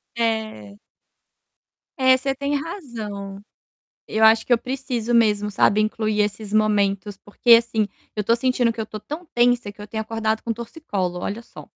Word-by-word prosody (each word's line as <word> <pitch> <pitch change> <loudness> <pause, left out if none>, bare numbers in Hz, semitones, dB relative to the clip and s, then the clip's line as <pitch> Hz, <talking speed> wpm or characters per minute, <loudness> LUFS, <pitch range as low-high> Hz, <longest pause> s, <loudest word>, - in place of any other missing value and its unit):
É. 220 - -2 1.2
É, 260 0 +5
você 270 +1 -1
tem 280 +2 -2
razão. 220 - -6 0.7
Eu 220 +1 0
acho 225 0 +5
que - - -7
eu - - +5
preciso 250 -2 -3
mesmo, 210 -3 +3
sabe, 205 +1 +3
incluir 215 0 0
esses 205 0 -3
momentos, 205 -2 +1
porque 220 +4 0
assim, 230 -2 +5 0.3
eu 210 - -1
tô 230 +3 +3
sentindo 245 -1 +1
que 225 - -4
eu - - -4
tô 215 0 -8
tão 305 - -7
tensa 240 -3 +2
que 205 - -14
eu 210 - -8
tenho 220 +1 -3
acordado 220 0 -2
com 230 - -2
torcicolo, 210 - -4
olha 205 +5 -4
só. - - -13
220 Hz, 170 wpm, -22 LUFS, 210-240 Hz, 1.2 s, É